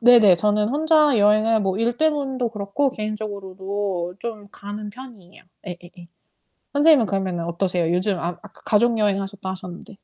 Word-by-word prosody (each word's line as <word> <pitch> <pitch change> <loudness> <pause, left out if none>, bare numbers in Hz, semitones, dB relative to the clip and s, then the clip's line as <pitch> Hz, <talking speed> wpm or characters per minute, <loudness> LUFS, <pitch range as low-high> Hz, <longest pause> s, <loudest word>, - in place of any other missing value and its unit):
네네. 230 -6 +7
저는 210 +3 +1
혼자 300 -1 +3
여행을 215 +2 +3
뭐 195 -1 -1
일 235 +1 0
때문도 275 -5 0
그렇고 210 +6 -1
개인적으로도 200 -4 -4
좀 215 -3 -7
가는 205 +1 -8
편이에요. 215 -6 -14 0.3
예 175 - -5
예 175 - -14
예. 175 -1 -13 0.7
선생님은 290 -4 +5
그러면은 185 -3 -2
어떠세요? 170 -1 -1
요즘 185 +2 0
아 170 - -2
아까 195 +3 -12
가족 230 +2 +2
여행 205 -2 +1
하셨다 195 0 -6
하셨는데. 185 0 -9
210 Hz, 365 characters per minute, -22 LUFS, 190-235 Hz, 0.7 s, 네네